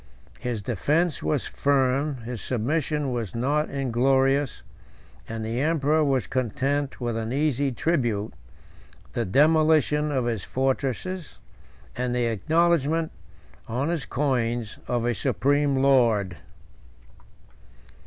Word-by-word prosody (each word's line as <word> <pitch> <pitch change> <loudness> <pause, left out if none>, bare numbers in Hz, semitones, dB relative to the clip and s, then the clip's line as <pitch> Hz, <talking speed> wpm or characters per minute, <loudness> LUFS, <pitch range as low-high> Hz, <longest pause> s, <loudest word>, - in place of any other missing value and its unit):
His 120 -4 -3
defence 150 - 0
was 75 - 0
firm, 140 +1 +1
his 120 -1 -5
submission 145 +3 -1
was 115 -4 -3
not 145 +6 0
inglorious, 135 +1 +1 0.7
and 110 -1 -4
the 115 +3 -2
emperor 155 0 +2
was 135 -3 +1
content 135 +3 -1
with 120 -2 -2
an 115 0 -3
easy 140 -1 +1
tribute, 120 -7 -1 0.8
the - - -1
demolition 150 - +3
of 130 -4 0
his 115 -5 -2
fortresses, 135 +7 -2 0.6
and 125 0 -1
the 120 -1 +1
acknowledgement, 160 - +1 0.6
on 125 +6 -1
his 160 -6 -2
coins, 120 -5 -1
of 120 -1 0
a 120 - +1
supreme 140 +5 +1
lord. 120 -9 +3
135 Hz, 110 wpm, -25 LUFS, 120-150 Hz, 0.8 s, demolition